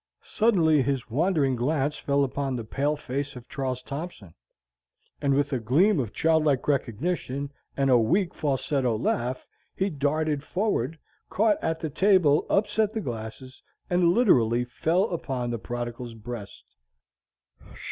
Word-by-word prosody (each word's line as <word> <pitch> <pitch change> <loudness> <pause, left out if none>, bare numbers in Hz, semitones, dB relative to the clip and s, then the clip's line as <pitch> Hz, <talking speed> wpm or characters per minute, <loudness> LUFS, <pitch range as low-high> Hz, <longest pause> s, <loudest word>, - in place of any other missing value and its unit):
Suddenly, 170 - +3
his 130 -3 -2
wandering 145 -2 +2
glance 140 +4 0
fell 140 -1 +1
upon 135 0 -2
the 120 - -4
pale 140 +7 -1
face 140 0 -4
of 125 0 -10
Charles 130 -2 -3
Thompson; 140 - -7 0.9
and 140 -1 +2
with 145 0 0
a 130 - +1
gleam 150 - +3
of 115 -6 -2
childlike 155 -3 +2
recognition, 140 - -1 0.3
and 135 -1 +2
a 125 - +6
weak, 170 - +1
falsetto 135 -4 0
laugh, 120 +3 -1 0.3
he 190 +1 0
darted 150 0 0
forward, 165 - -1 0.3
caught 210 0 +2
at 160 0 -1
the 160 - -2
table, 180 -4 +4
upset 210 +1 +1
the 225 - -2
glasses, 120 - -7 0.3
and 175 -1 +4
literally 125 - +3
fell 160 +9 +1
upon 130 -7 -3
the 115 - -3
prodigal's 120 0 -5
breast. 115 -2 -8
140 Hz, 135 wpm, -26 LUFS, 125-165 Hz, 0.9 s, a